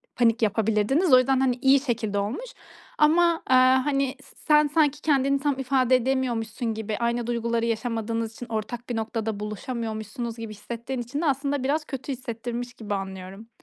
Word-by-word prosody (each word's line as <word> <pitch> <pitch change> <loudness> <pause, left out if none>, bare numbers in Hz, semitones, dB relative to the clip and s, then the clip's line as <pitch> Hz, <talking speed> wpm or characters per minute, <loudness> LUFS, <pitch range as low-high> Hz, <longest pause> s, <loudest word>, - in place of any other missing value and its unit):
panik 235 -1 +3
yapabilirdiniz. 220 - +2
O - - +10
yüzden, 260 +1 +2
hani, 260 -2 +2
iyi 270 +1 +6
şekilde 225 -6 -1
olmuş. 245 - -4 0.4
Ama, 330 +2 +4
eee, 260 - +6
hani, 260 +1 +3
s - - -19
sen 300 -1 +5
sanki 295 -1 +2
kendini 275 -2 +2
tam 280 -1 -1
ifade 260 -1 +3
edemiyormuşsun 240 -3 -1
gibi, 220 -1 -4
aynı 235 0 -1
duyguları 235 -1 0
yaşamadığınız 230 0 -2
için 245 - -8
ortak 230 +2 -4
bir 240 - -2
noktada 220 -1 -3
buluşamıyormuşsunuz 220 +1 -5
gibi 225 -1 -6
hissettiğin 235 +4 -5
için 260 +6 -4
de - - -1
aslında 280 -1 0
biraz 300 +3 0
kötü 270 0 -5
hissettirmiş 240 -1 -5
gibi 215 -4 -5
anlıyorum. 195 +2 -7
240 Hz, 165 wpm, -25 LUFS, 225-270 Hz, 0.4 s, O